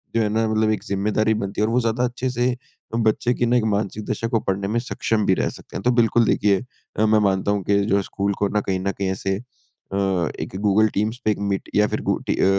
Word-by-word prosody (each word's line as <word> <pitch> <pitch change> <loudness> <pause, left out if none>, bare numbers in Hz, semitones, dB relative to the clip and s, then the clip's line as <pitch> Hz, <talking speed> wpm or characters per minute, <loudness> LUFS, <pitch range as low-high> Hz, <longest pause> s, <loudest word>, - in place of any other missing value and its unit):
जो 115 - +3
है 105 - +2
ना 110 +1 +1
मतलब 110 0 +1
एक 110 - -2
ज़िम्मेदारी 105 +2 +1
बनती 100 -1 -3
है - - +4
और 115 - -1
वो 125 - +4
ज़्यादा 115 +2 0
अच्छे 125 +1 -1
से 125 0 +1
अ, 120 -2 -9
बच्चे 115 +2 +2
की 120 - 0
ना 120 +1 +3
एक 120 - +1
मानसिक 105 +1 -3
दशा 115 - -1
को 115 -1 +1
पढ़ने 100 -1 -2
में 115 +3 0
सक्षम 110 -3 -1
भी 95 - +4
रह - - 0
सकते - - -13
हैं। - - -5
तो 125 - +3
बिल्कुल 120 -1 +3
देखिए 100 -1 +2 0.4
अ, 110 - +4
मैं 110 0 +4
मानता 100 -1 +1
हूँ 100 -1 -1
कि 100 +2 +2
जो 105 - +2
हैं 100 - +3
स्कूल 100 +1 -2
को 100 - +2
ना 105 - 0
कहीं 95 -1 -1
न 100 +1 -1
कहीं 95 -1 -3
ऐसे 95 0 -1
अ, 120 -4 -13 0.4
एक - - -5
गूगल 105 +1 +4
टीम्स 110 +4 -1
पे 110 - +4
एक - - -2
मीट 95 - -2
या 105 0 +4
फिर - - -3
गु - - +2
टी - - +1
अ, - - +2
110 Hz, 270 wpm, -22 LUFS, 100-115 Hz, 0.4 s, है